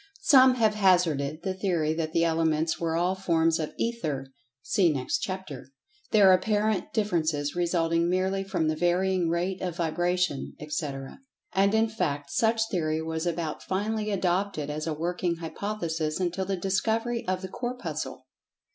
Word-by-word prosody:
Some 260 -4 +7
have 220 -3 +3
hazarded 170 -7 +2
the 190 - -1
theory 175 -5 0
that 160 -1 -2
the 165 +1 +2
Elements 160 -1 +1
were 165 -1 -1
all 175 +2 +1
forms 165 -3 +1
of 155 - -3
Ether 155 - -2 0.4
(see 195 -6 +3
next 130 -3 -1
chapter), 175 -9 -5 0.4
their 200 -3 +6
apparent 210 +1 +1
differences 160 -9 0
resulting 170 -1 +1
merely 190 +2 0
from 180 -5 -1
the 155 - +1
varying 175 +1 +1
rate 180 +3 -1
of 180 -3 -3
vibration, 175 -2 -1
etc. 150 - -5 0.3
And, 200 +2 +3
in 220 +1 +3
fact, 145 -10 -3
such 225 +5 +2
theory 160 -3 0
was 160 +1 -3
about 165 -2 -3
finally 215 +3 -2
adopted 185 -5 -1
as 155 +2 -4
a 160 - 0
working 175 +2 -1
hypothesis 165 -2 -3
until 185 +1 -1
the 195 0 -2
discovery 225 +6 0
of 185 0 -1
the - - -3
Corpuscle. 170 - -5
175 Hz, 150 wpm, -27 LUFS, 160-195 Hz, 0.4 s, Some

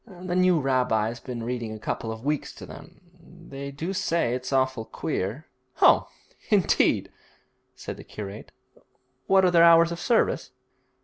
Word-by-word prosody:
The 180 -3 -6
new 185 -2 +4
rabbi's 125 -4 0
been 120 -3 -6
reading 120 -2 -4
a - - -7
couple 110 +1 -4
of 110 +3 -8
weeks 150 0 -1
to - - -10
them. - - -13 0.5
They 140 0 -6
do 160 +7 -5
say 165 -9 0
it's 125 +1 -4
awful 130 -3 +1
queer.' 110 +6 -4 0.3
'Oh, - - +5 0.4
indeed!' - - +2 0.6
said - - -7
the - - -11
curate; 105 0 -9 0.8
'what 190 -1 +5
are 180 - +3
their 170 -1 +5
hours 170 0 +6
of 170 - -5
service?' 235 +4 +1
135 Hz, 150 wpm, -25 LUFS, 115-170 Hz, 0.8 s, hours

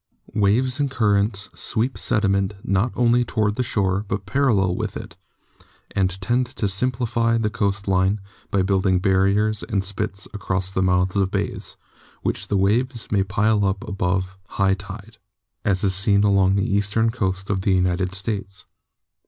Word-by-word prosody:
Waves 120 +6 +2
and 140 -1 +1
currents 105 -4 0
sweep 120 +4 -1
sediment 100 -2 0
not 100 +5 +1
only 120 0 +3
toward 110 -3 0
the 130 - -1
shore, 100 -5 0
but 95 0 -3
parallel 100 -5 +2
with - - -3
it, - - -9 0.8
and 95 -1 0
tend 120 +6 0
to 120 -5 -2
simplify 115 +2 0
the 110 -2 0
coast 100 -2 -1
line 95 +2 +2 0.3
by 100 -2 +1
building 95 -1 +2
barriers 100 +3 +2
and 100 -5 -1
spits 100 0 -3
across 95 -2 -2
the 95 - -1
mouths 90 +1 +2
of 95 -1 +2
bays, - - -3 0.5
which - - -2
the 100 - 0
waves 115 +5 0
may 100 -2 +3
pile 105 +2 +1
up 100 +4 -1
above 95 -2 -1
high 95 -1 +1
tide, 100 +3 -9 0.4
as 95 -1 +1
is 95 -2 +2
seen 100 +2 +4
all 100 - +3
along 95 -1 +3
the 100 - +1
eastern 105 +3 +1
coast 95 -4 -2
of 95 -2 0
the 95 0 +1
United 90 0 0
States. 100 -2 -4
100 Hz, 160 wpm, -22 LUFS, 95-110 Hz, 0.8 s, seen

